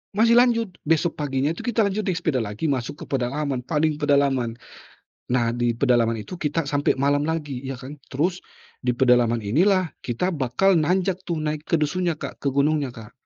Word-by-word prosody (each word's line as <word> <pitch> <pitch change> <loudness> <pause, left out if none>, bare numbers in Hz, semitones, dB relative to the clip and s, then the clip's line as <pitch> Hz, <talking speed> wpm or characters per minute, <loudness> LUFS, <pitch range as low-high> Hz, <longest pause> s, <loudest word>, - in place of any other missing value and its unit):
Masih 230 +2 +5
lanjut, 230 -4 +2 0.2
besok 165 +1 +1
paginya 140 0 0
itu 165 - -6
kita 235 -2 +1
lanjut 200 0 0
di 185 - +1
sepeda 160 -6 0
lagi 105 +1 -5
masuk 130 +2 -3
ke - - -8
pedalaman 135 +1 -1
paling 150 +3 0
pedalaman. 140 -5 +2 0.7
Nah 120 -2 +1
di 120 0 +1
pedalaman 120 -3 +2
itu 110 - -8
kita 165 -2 -2
sampai 145 -1 +1
malam 140 +2 +2
lagi, 145 -6 -3
ya 135 -1 -5
kan. 140 +3 -10
Terus 175 +7 -1 0.4
di 125 - -1
pedalaman 120 -2 +4
inilah 165 - +2
kita 130 +10 -1
bakal 145 +7 +2
nanjak 185 +3 0
tuh 175 -3 -3
naik 155 -1 -2
ke 165 - +3
dusun 175 +4 0
nya 165 - -1
Kak, - - -7
ke 140 - +1
Gunungnya, 140 +1 +1
Kak. 115 -2 -12
145 Hz, 185 wpm, -23 LUFS, 125-170 Hz, 0.7 s, Masih